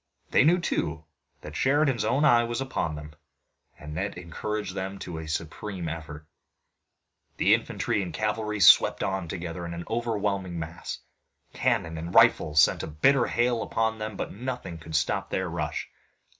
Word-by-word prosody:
They -, -, +5 dB
knew, 165 Hz, +5 st, +5 dB
too, 80 Hz, -, -2 dB, 0.4 s
that -, -, -9 dB
Sheridan's 135 Hz, -2 st, +2 dB
own 135 Hz, +7 st, +2 dB
eye 120 Hz, -4 st, +6 dB
was 120 Hz, +1 st, -3 dB
upon 130 Hz, -12 st, -2 dB
them, 75 Hz, 0 st, -9 dB, 0.6 s
and 75 Hz, 0 st, -8 dB
it 100 Hz, 0 st, -3 dB
encouraged 95 Hz, +3 st, -4 dB
them 95 Hz, 0 st, -4 dB
to 85 Hz, -4 st, -6 dB
a 80 Hz, -, -7 dB
supreme 85 Hz, +4 st, -4 dB
effort. 80 Hz, -1 st, -7 dB, 1.1 s
Infantry -, -, +2 dB
and 90 Hz, -3 st, -4 dB
cavalry 105 Hz, +3 st, -2 dB
swept -, -, +7 dB
on 95 Hz, -2 st, -2 dB
together 85 Hz, +1 st, -5 dB
in 85 Hz, 0 st, -5 dB
an 85 Hz, -, -5 dB
overwhelming 105 Hz, -6 st, -1 dB
mass. 85 Hz, 0 st, -5 dB, 0.6 s
Cannon 80 Hz, 0 st, 0 dB
and 85 Hz, +2 st, -6 dB
rifles 75 Hz, -1 st, +5 dB
sent -, -, +5 dB
a -, -, -5 dB
bitter 120 Hz, -, +3 dB
hail 120 Hz, -1 st, +1 dB
upon 110 Hz, 0 st, -1 dB
them, 110 Hz, -2 st, -5 dB
but -, -, -4 dB
nothing 125 Hz, -7 st, -5 dB
could 80 Hz, 0 st, -7 dB
stop -, -, 0 dB
their -, -, -1 dB
rush. -, -, -3 dB
95 Hz, 155 wpm, -27 LUFS, 80-115 Hz, 1.1 s, swept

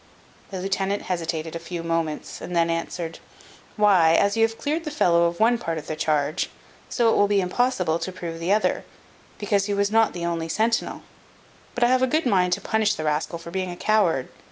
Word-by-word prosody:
The 190 Hz, -, -5 dB
lieutenant 195 Hz, +1 st, -1 dB
hesitated 165 Hz, -2 st, -3 dB
a -, -, -3 dB
few 170 Hz, 0 st, -6 dB
moments, 165 Hz, -2 st, -3 dB
and 180 Hz, -, -6 dB
then 170 Hz, 0 st, +2 dB
answered: 165 Hz, 0 st, -4 dB, 0.6 s
"Why, 185 Hz, -6 st, +5 dB
as 200 Hz, +3 st, +2 dB
you 225 Hz, -, +1 dB
have 225 Hz, 0 st, +2 dB
cleared 310 Hz, +3 st, -2 dB
the 310 Hz, -, -4 dB
fellow 170 Hz, -, +3 dB
of 170 Hz, 0 st, -2 dB
one 235 Hz, +2 st, +3 dB
part 165 Hz, -7 st, -3 dB
of 155 Hz, -, -6 dB
the 155 Hz, -, -4 dB
charge, 155 Hz, +2 st, 0 dB, 0.4 s
so 230 Hz, -3 st, +2 dB
it -, -, +1 dB
will 205 Hz, -, +4 dB
be 200 Hz, 0 st, +2 dB
impossible 180 Hz, -4 st, 0 dB
to 185 Hz, -, -4 dB
prove 170 Hz, -2 st, -6 dB
the 170 Hz, +3 st, -1 dB
other, 210 Hz, +1 st, +1 dB, 0.5 s
because 205 Hz, -1 st, 0 dB
he 205 Hz, -, -1 dB
was 200 Hz, 0 st, +1 dB
not 225 Hz, 0 st, +3 dB
the 175 Hz, -1 st, -4 dB
only 165 Hz, -1 st, -2 dB
centinel. 225 Hz, +6 st, 0 dB, 0.7 s
But 245 Hz, -, +1 dB
I -, -, +6 dB
have 255 Hz, 0 st, +3 dB
a 260 Hz, -, +3 dB
good 310 Hz, +4 st, 0 dB
mind 180 Hz, -6 st, +2 dB
to -, -, -2 dB
punish 215 Hz, -1 st, +1 dB
the 155 Hz, -, -5 dB
rascal 155 Hz, +2 st, -1 dB
for 170 Hz, 0 st, -10 dB
being 185 Hz, 0 st, -2 dB
a 175 Hz, -, -7 dB
coward. 190 Hz, -12 st, +1 dB
180 Hz, 215 wpm, -24 LUFS, 165-215 Hz, 0.7 s, I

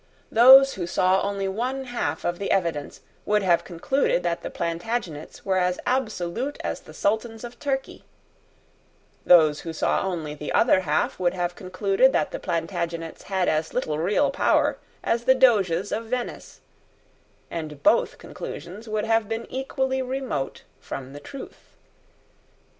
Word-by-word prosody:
Those 265 Hz, +4 st, +8 dB
who 175 Hz, -3 st, -4 dB
saw 185 Hz, +1 st, +2 dB
only 200 Hz, -1 st, -2 dB
one 250 Hz, +7 st, -2 dB
half 245 Hz, -2 st, -3 dB
of 175 Hz, 0 st, -1 dB
the 200 Hz, -, -3 dB
evidence 170 Hz, -6 st, -1 dB, 0.2 s
would 210 Hz, -1 st, +1 dB
have 175 Hz, -3 st, +3 dB
concluded 180 Hz, +3 st, 0 dB
that 170 Hz, -1 st, -1 dB
the -, -, -5 dB
Plantagenets 170 Hz, -2 st, -4 dB
were 190 Hz, -1 st, +2 dB
as 180 Hz, 0 st, 0 dB
absolute 245 Hz, +1 st, -1 dB
as -, -, -3 dB
the -, -, -15 dB
Sultans 220 Hz, +2 st, -1 dB
of 240 Hz, 0 st, -9 dB
Turkey: 270 Hz, -2 st, -3 dB, 1.2 s
those 155 Hz, -4 st, +6 dB
who 165 Hz, -, -6 dB
saw 160 Hz, -, 0 dB
only 165 Hz, -6 st, -3 dB
the 150 Hz, 0 st, -6 dB
other 225 Hz, -5 st, +4 dB
half 155 Hz, -2 st, 0 dB
would 180 Hz, 0 st, +1 dB
have 175 Hz, -1 st, -1 dB
concluded 195 Hz, +7 st, +2 dB
that 150 Hz, -, +1 dB
the -, -, -5 dB
Plantagenets 165 Hz, 0 st, -3 dB
had 190 Hz, -2 st, 0 dB
as 155 Hz, +1 st, 0 dB
little 155 Hz, -12 st, -1 dB
real 210 Hz, -, +2 dB
power -, -, +2 dB, 0.2 s
as 235 Hz, +1 st, 0 dB
the 260 Hz, 0 st, +6 dB
Doges 205 Hz, -8 st, +3 dB
of 225 Hz, +2 st, -2 dB
Venice; 245 Hz, +1 st, -5 dB, 0.9 s
and 155 Hz, -3 st, -6 dB
both -, -, +3 dB
conclusions 205 Hz, +6 st, -8 dB
would 215 Hz, 0 st, -1 dB
have 225 Hz, -1 st, +1 dB
been 225 Hz, +1 st, -3 dB
equally 265 Hz, 0 st, -1 dB
remote 255 Hz, -, -3 dB, 0.2 s
from 135 Hz, 0 st, -7 dB
the 145 Hz, -, -8 dB
truth. 275 Hz, -, -11 dB
195 Hz, 150 wpm, -25 LUFS, 170-240 Hz, 1.2 s, Those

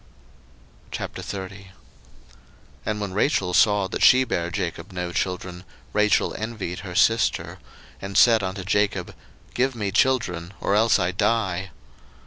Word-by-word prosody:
01:030:001 95 Hz, 0 st, -6 dB, 1.2 s
And 105 Hz, -1 st, -1 dB
when 100 Hz, -3 st, -4 dB
Rachel 100 Hz, -4 st, +1 dB
saw 105 Hz, 0 st, +4 dB
that -, -, -5 dB
she 130 Hz, 0 st, +7 dB
bare 85 Hz, -8 st, -2 dB
Jacob 90 Hz, +2 st, -4 dB
no 90 Hz, -1 st, -4 dB
children, 90 Hz, 0 st, -3 dB, 0.3 s
Rachel 105 Hz, 0 st, +2 dB
envied 105 Hz, -5 st, -5 dB
her 90 Hz, -3 st, -8 dB
sister; 115 Hz, +4 st, +2 dB, 0.4 s
and 100 Hz, 0 st, -4 dB
said 115 Hz, -3 st, +6 dB
unto 95 Hz, 0 st, -4 dB
Jacob, 100 Hz, -1 st, 0 dB, 0.4 s
Give 130 Hz, +1 st, 0 dB
me 105 Hz, -4 st, -2 dB
children, 100 Hz, -7 st, 0 dB
or -, -, 0 dB
else 110 Hz, +2 st, +4 dB
I 90 Hz, -2 st, 0 dB
die. 95 Hz, -2 st, 0 dB
100 Hz, 125 wpm, -24 LUFS, 90-110 Hz, 1.2 s, she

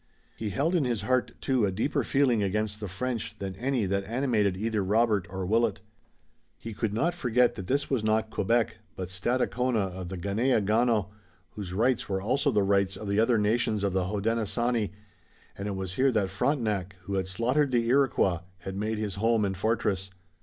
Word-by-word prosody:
He 110 Hz, -, -4 dB
held 140 Hz, -, 0 dB
in 170 Hz, -5 st, +3 dB
his 120 Hz, -4 st, -1 dB
heart, 125 Hz, -2 st, +1 dB
too, 130 Hz, -4 st, +1 dB
a 100 Hz, -, +2 dB
deeper 110 Hz, +10 st, 0 dB
feeling 130 Hz, -6 st, +2 dB
against 105 Hz, +1 st, -1 dB
the 105 Hz, -, -4 dB
French 110 Hz, +3 st, -4 dB
than 95 Hz, -2 st, -5 dB
any 125 Hz, -1 st, 0 dB
that 100 Hz, +1 st, 0 dB
animated 110 Hz, -5 st, +1 dB
either 110 Hz, 0 st, -1 dB
Robert 105 Hz, -1 st, +2 dB
or 95 Hz, -1 st, -4 dB
Willet. 110 Hz, +2 st, +1 dB, 0.8 s
He 115 Hz, -, -7 dB
could 110 Hz, 0 st, -2 dB
not 160 Hz, +12 st, +1 dB
forget 125 Hz, -7 st, +2 dB
that 95 Hz, -, -7 dB
this 140 Hz, +1 st, +1 dB
was 130 Hz, -6 st, 0 dB
not 110 Hz, 0 st, +1 dB
Quebec, 115 Hz, +2 st, +1 dB, 0.2 s
but 90 Hz, -1 st, -5 dB
Stadacona 120 Hz, +1 st, 0 dB
of 90 Hz, -1 st, -6 dB
the 95 Hz, -, -5 dB
Ganeagaono, 110 Hz, +1 st, +1 dB, 0.4 s
whose 100 Hz, -4 st, -7 dB
rights 120 Hz, +4 st, +1 dB
were 95 Hz, -1 st, 0 dB
also 135 Hz, +9 st, +1 dB
the 105 Hz, -6 st, +2 dB
rights 100 Hz, -1 st, +1 dB
of 105 Hz, -, -7 dB
the 100 Hz, +1 st, +2 dB
other 115 Hz, +1 st, +4 dB
nations 105 Hz, 0 st, +1 dB
of 100 Hz, -2 st, 0 dB
the 95 Hz, -1 st, +1 dB
Hodenosaunee, 115 Hz, +2 st, 0 dB, 0.7 s
and 100 Hz, -, -5 dB
it 100 Hz, -, -2 dB
was 95 Hz, -1 st, -4 dB
here 130 Hz, +6 st, +3 dB
that 100 Hz, -5 st, 0 dB
Frontenac, 100 Hz, -, -1 dB
who 100 Hz, -, -5 dB
had 95 Hz, -1 st, 0 dB
slaughtered 125 Hz, +9 st, +1 dB
the 120 Hz, -2 st, +1 dB
Iroquois, 120 Hz, -9 st, +3 dB, 0.2 s
had 95 Hz, -, -6 dB
made 110 Hz, +2 st, -2 dB
his 105 Hz, -3 st, -3 dB
home 115 Hz, -2 st, +3 dB
and 95 Hz, -1 st, -2 dB
fortress. 100 Hz, -2 st, 0 dB
110 Hz, 190 wpm, -28 LUFS, 100-120 Hz, 0.8 s, other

